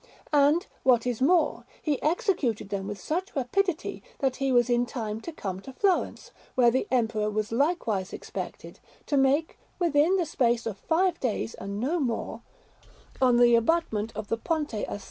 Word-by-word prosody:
And, 295 +5 +4 0.2
what 245 -3 +4
is 245 -1 -2
more, 325 +3 +3 0.2
he 295 -4 -1
executed 310 - 0
them 195 -1 -3
with 205 -1 -5
such 345 - -3
rapidity 335 +7 -1 0.2
that 265 -2 0
he 270 -1 0
was 245 -1 +4
in 240 0 +2
time 220 -3 -4
to 335 - -6
come 190 - -5
to 265 +7 -10
Florence, 385 +5 0 0.2
where 240 -2 +5
the 260 - 0
Emperor 220 -4 +1
was 215 0 -2
likewise 230 - 0
expected, - - -7 0.3
to 290 - -1
make 275 +4 +2 0.2
within 335 0 +3
the 360 -3 +1
space 240 -5 +1
of 210 -4 -4
five 345 +1 +1
days 235 -2 -2
and 200 +1 -6
no 300 +9 0
more, 240 -6 -2 0.8
on 250 -2 +5
the 240 0 +6
abutment 230 -4 +1
of 215 -1 -5
the 230 - 0
Ponte 300 +2 -2
a 210 - -3
S. - - -4
255 Hz, 175 wpm, -27 LUFS, 225-315 Hz, 0.8 s, the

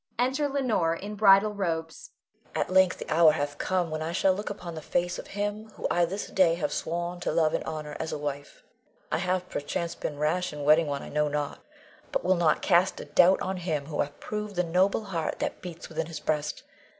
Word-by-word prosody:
Enter 265 +4 +1
Leonore, 230 -12 +1
in 205 +5 -6
bridal 205 0 +5
robes.] 190 - -3 0.5
Leonore. - - +2
At - - -5
length 190 -1 +5
the - - -8
hour 160 -1 +6
hath 145 -1 -3
come, 180 -3 0
when 155 0 -3
I 160 +1 -2
shall 190 +1 +3
look 205 +3 -4
upon 180 -4 -6
the 160 - -6
face 175 +3 -1
of - - -8
him 205 +2 -2
whom - - -7
I 175 0 +3
this 195 +4 -4
day 175 -3 +3
have 155 -4 -2
sworn 175 +2 -3
to - - -1
love 155 -2 +2
and - - 0
honor 155 -2 -5
as 160 - -3
a - - -2
wife. 145 -1 -6 0.5
I - - +1
have, 180 0 -1
perchance, 170 +4 -3
been 145 - -5
rash 155 +4 0
in 145 -1 -5
wedding 155 +2 +5
one 140 -1 -3
I - - -8
know 150 0 +1
not, 145 -1 -3 0.5
but - - -1
will 185 - +5
not 170 -4 +2
cast 180 0 +3
a - - -6
doubt 175 +6 +4
on 190 0 -2
him 160 -5 -2
who 150 0 -2
hath 145 0 -4
proved 210 -1 -5
the 180 - +2
noble 185 +5 +2
heart 170 -6 -3
that - - -3
beats 175 -2 -8
within 160 -1 -3
his 165 -2 -6
breast. 150 -1 -2
170 Hz, 225 wpm, -28 LUFS, 155-190 Hz, 0.5 s, hour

